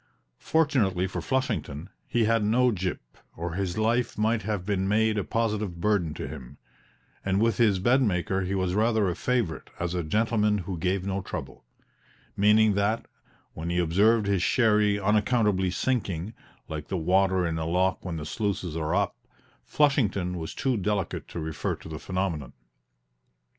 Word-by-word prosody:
Fortunately 120 - +1
for 95 - -4
Flushington, 85 - -2 0.2
he 120 - +1
had 115 0 +2
no 120 +4 +3
gyp, 95 -3 -2 0.4
or 85 +1 -4
his 95 0 -2
life 115 +3 +1
might 110 +1 +1
have 105 -5 -3
been 95 -2 0
made 110 +2 +2
a 105 - 0
positive 105 -6 -1
burden 90 -6 +1
to - - -5
him, 65 +3 -9 0.7
and 95 0 +1
with 115 -1 +2
his 105 -5 +4
bedmaker 95 -4 +2
he 95 +2 -2
was 95 -1 0
rather 110 0 +2
a 90 - -1
favorite 120 -10 -1
as 85 0 -2
"a 90 - 0
gentleman 105 +4 +1
what 90 -2 -5
gave 95 +2 0
no 100 0 -2
trouble" - - -7 0.7
meaning 105 +1 +5
that, 105 +3 0 0.5
when 80 +2 -5
he 85 - -1
observed 100 +6 +3
his 100 -2 +1
sherry 105 -2 +3
unaccountably 105 -2 +2
sinking, 100 -4 -2 0.3
like 75 -2 -6
the 95 - -2
water 95 +2 +2
in 80 -1 -2
a 80 - -2
lock 95 +3 +1
when 85 -3 -4
the 75 - -5
sluices 95 -2 -2
are 80 +1 -1
up, 100 -2 0 0.5
Flushington 100 -12 +1
was 80 - -6
too 130 -3 0
delicate 100 -1 -2
to - - -6
refer 80 -1 -3
to - - -13
the 80 -1 -6
phenomenon. 90 -8 -3
100 Hz, 165 wpm, -27 LUFS, 90-110 Hz, 0.7 s, meaning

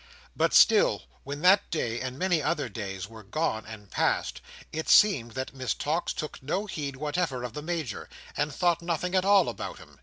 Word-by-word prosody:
But - - +2
still, - - +5 0.2
when 145 +2 -6
that 190 +3 +5
day 120 -7 -2
and 130 0 -4
many 180 -1 +1
other 150 -3 0
days 95 -3 -5
were 110 0 -12
gone 110 0 -2
and 105 -3 -11
past, - - 0 0.3
it 160 0 -3
seemed 135 - +5
that 130 0 -4
Miss 130 -2 -2
Tox 160 +4 -1
took 155 -2 -6
no 170 +10 -2
heed 145 -8 -4
whatever 150 -2 -2
of 125 -2 -5
the 150 - -5
Major, 155 -8 -4 0.3
and 145 +1 0
thought 170 +3 +1
nothing 175 +1 -2
at 185 0 +2
all 200 -2 +5
about - - -5
him. - - -16
150 Hz, 190 wpm, -28 LUFS, 120-170 Hz, 0.3 s, still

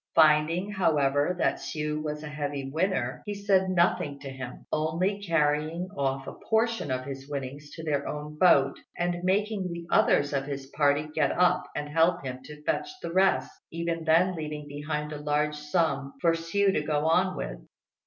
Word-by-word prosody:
Finding, 160 +5 +4
however, 150 -4 +2
that - - +1
Hsiu 150 -1 -3
was 150 0 -4
a - - -5
heavy 145 -2 -4
winner, 140 -7 -1
he 205 - -2
said 195 -2 +2
nothing 170 -5 +1
to 135 - -6
him, 130 -1 -8
only 170 +6 0
carrying 165 0 0
off 135 -2 -1
a - - -6 0.2
portion 225 +1 +1
of 130 0 -2
his 135 0 -7
winnings 140 +1 -5
to 160 - -8
their 145 -3 -1
own 150 0 -5
boat 140 -7 +5 0.2
and 175 0 -1
making 195 0 0
the 170 0 -6
others 145 0 +3
of 135 -1 0
his 140 -1 -5
party 145 +1 +2
get 150 -3 +2
up 180 0 +3
and 150 - -3
help 165 +3 +2
him 130 0 -5
to 150 0 -11
fetch 365 - -1
the 165 - -4
rest, 190 +1 +3 0.2
even 165 0 -3
then 170 +3 +3
leaving 150 -2 -5
behind 150 +1 -4
a 150 - -6
large 150 0 +1
sum 150 -3 -1
for 170 - +4
Hsiu 190 +4 +1
to 155 - +1
go 150 0 0
on 185 +3 +2
with. - - -5
150 Hz, 180 wpm, -28 LUFS, 145-175 Hz, 0.2 s, boat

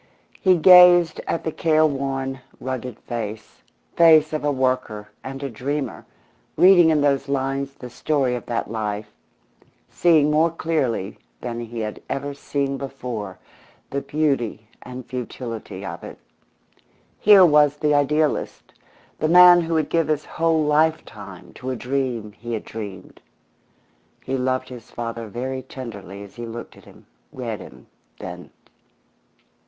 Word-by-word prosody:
He 185 -3 +4
gazed 175 -1 +7
at 165 - -2
the 160 - -2
care 155 0 +2
worn, 135 -2 -2 0.2
rugged 130 -3 -5
face 110 -3 -6 0.3
face 160 -2 +6
of 155 - -2
a 145 - +1
worker 130 -6 -2
and 135 +1 -7
a 140 - -3
dreamer, 135 +2 -4 0.5
reading 180 -3 +7
in 155 -2 +2
those 140 -1 +1
lines 135 0 -2
the 125 - -9
story 135 -1 0
of 120 - -5
that 115 -2 -3
life, 105 -1 -4 0.8
seeing 155 -4 +3
more 160 +2 +3
clearly 145 - -2 0.2
than 120 -1 -4
he 120 0 -6
had 105 -1 -5
ever 140 +1 -3
seen 140 -1 -3
before 125 -8 -6 0.5
the 140 - -2
beauty 135 -7 -1
and 125 0 -9
futility 125 -2 -6
of - - -7
it. - - -9 1.0
Here 200 -3 +7
was 150 -2 +4
the 150 0 +1
idealist, 150 +1 0 0.5
the 155 - 0
man 180 0 +8
who 165 0 -2
would 155 -2 0
give 165 -1 +1
his 155 -1 -1
whole 165 -1 +1
lifetime 150 - -1
to 130 - -7
a 130 - -2
dream 125 -4 -3
he 120 +3 -7
had 110 - -4
dreamed. 100 -4 -9 1.0
He 135 - -3
loved 130 0 -1
his 125 -3 -11
father 115 -1 -5
very 130 +4 -4
tenderly 105 -7 -9
as 100 - -14
he 120 0 -6
looked 115 +1 -8
at - - -18
him, - - -18 0.3
read 115 -4 -5
him, - - -13 0.3
then. 90 0 -9
135 Hz, 145 wpm, -22 LUFS, 115-155 Hz, 1.0 s, man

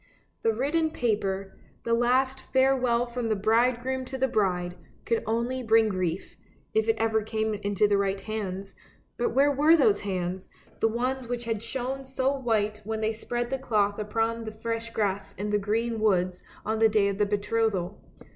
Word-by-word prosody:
The 225 - +3
written 295 +8 +1
paper, 195 -8 -1 0.3
the 230 - 0
last 260 +3 +2
farewell 255 -2 +3
from 240 -1 -3
the 215 - +2
bridegroom 240 +5 +1
to 265 +1 -5
the 265 +1 +2
bride, 180 -7 0 0.3
could 230 - +1
only 235 +3 -1
bring 225 -2 +4
grief, 185 -3 -3 0.4
if 440 +1 +2
it 450 - +4
ever 220 -1 +1
came 220 0 -1
into 205 0 +1
the 200 -1 +2
right 195 0 0
hands; 195 -2 -5 0.4
but 240 0 -1
where 280 +2 +5
were 300 +4 +5
those 215 -9 +4
hands, 185 -2 -3 0.3
the - - +3
ones 250 +3 -2
which 240 0 -3
had 225 -3 -2
shone 260 +3 -4
so 265 +1 0
white 215 -5 0
when 220 +1 -3
they 220 0 +1
spread 240 +2 -3
the 270 - -1
cloth 210 -5 +1
upon 225 +2 -1
the 220 - -5
fresh 230 +1 -4
grass 200 -3 -2
in 210 +2 -3
the 210 - +2
green 225 +3 -1
woods 185 -4 +1 0.2
on 220 +1 -1
the 225 0 +6
day 210 -2 +3
of 200 0 -2
the 210 - +4
betrothal? 205 -2 -1
225 Hz, 180 wpm, -27 LUFS, 205-245 Hz, 0.4 s, the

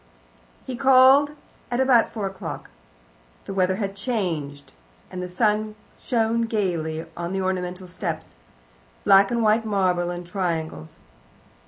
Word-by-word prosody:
He 260 - -5
called 265 +2 +6 0.4
at 245 0 -1
about 260 -3 +4
four 215 -3 -4
o'clock. 190 -1 -6 0.7
The - - -5
weather 185 -1 +1
had 200 -1 -3
changed, 175 - -3 0.4
and 180 - -5
the 180 - -5
sun 210 +2 0 0.3
shone 230 -1 0
gaily 170 -7 -2
on 170 +2 -4
the 195 - -1
ornamental 185 0 -3
steps 175 - -5 0.7
black 195 0 +6
and 235 -1 0
white 220 +1 +3
marble 185 -5 +1
in 175 0 -5
triangles. 165 - -4
195 Hz, 130 wpm, -24 LUFS, 180-225 Hz, 0.7 s, called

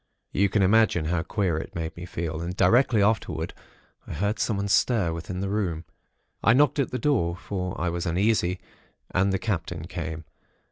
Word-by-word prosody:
You 100 +1 +2
can 100 -1 +2
imagine 100 -4 +4
how 85 +1 0
queer 90 -3 -1
it - - -8
made 80 -1 -4
me 85 +1 -8
feel, 80 -2 -4
and 90 +2 -4
directly 115 +3 +4
afterwards, 95 -6 0 0.5
I - - -6
heard 100 +6 -1
someone 100 -1 0
stir 100 -4 +2
within 90 +3 -5
the 100 - -1
room. 90 -6 -2 0.6
I 115 - +6
knocked 145 +3 +3
at 140 - +1
the 125 - -3
door; 120 - +1
for 90 -1 -4
I 90 - 0
was 85 0 -3
uneasy, 90 0 +1 0.5
and 95 +2 +2
the 95 - +1
Captain 85 -5 -3
came. 80 -3 -5
90 Hz, 180 wpm, -26 LUFS, 85-105 Hz, 0.6 s, I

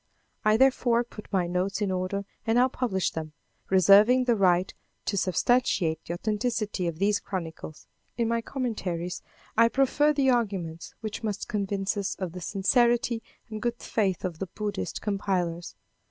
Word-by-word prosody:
I 215 0 +4
therefore 250 -2 +3
put 225 -3 -12
my 190 -3 +2
notes 180 +3 -1
in 205 -3 0
order 185 +2 -2 0.2
and 225 - +2
now 250 +1 +5
publish 220 -8 -1
them, 155 -1 -6 0.4
reserving 200 +7 +6
the 240 -2 +2
right 185 -2 +2 0.3
to - - -1
substantiate 185 -4 +1
the 170 - -4
authenticity 215 -2 -1
of 165 -2 -3
these 205 +3 +2
chronicles. 165 -5 -6 0.3
In 235 -2 +1
my 230 0 0
commentaries 195 -10 -3 0.3
I 230 +1 +6
proffer 275 +4 +3
the 275 -3 +3
arguments 195 -9 -2
which 215 -1 -5
must 210 -3 -3
convince 200 -1 -1
us 200 -2 -2
of 185 -3 -4
the 180 +1 -8
sincerity 235 +5 +2 0.3
and 215 -2 -6
good 240 +1 -1
faith 195 -7 -1
of 170 -3 -4
the 195 - -3
Buddhist 205 +2 -4
compilers. 180 - -2
200 Hz, 155 wpm, -27 LUFS, 185-235 Hz, 0.4 s, reserving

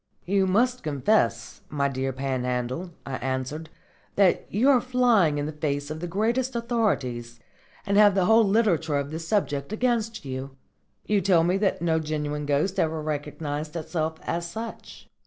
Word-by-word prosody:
"You 195 +1 +2
must 245 +6 +2
confess, 135 - 0
my 140 -2 0
dear 135 0 -2
Panhandle," 130 +4 -2 0.2
I 130 -1 -4
answered, 130 +5 -3 0.5
"that 195 -3 +3
you 225 +7 +2
are 255 -3 +4
flying 240 -11 +3
in 145 - -1
the 155 - -3
face 145 -1 -3
of 155 - -5
the 175 - -4
greatest 235 +8 0
authorities, 135 - -1 0.5
and 200 -1 +1
have 205 -2 +6
the 190 -2 +3
whole 225 +3 +6
literature 195 -8 +2
of 140 +1 -3
the 160 - -4
subject 160 -5 -1
against 225 - -1
you. 135 0 -6 0.5
You 210 -2 +2
tell 175 -3 +4
me 175 +2 +2
that 195 -4 0
no 160 -1 +2
genuine 150 -1 -3
ghost 150 +7 +1
ever 160 0 +1
recognised 150 0 -4
itself 160 -1 -2
as 170 0 -3
such." 225 +5 -8
160 Hz, 160 wpm, -26 LUFS, 145-205 Hz, 0.5 s, have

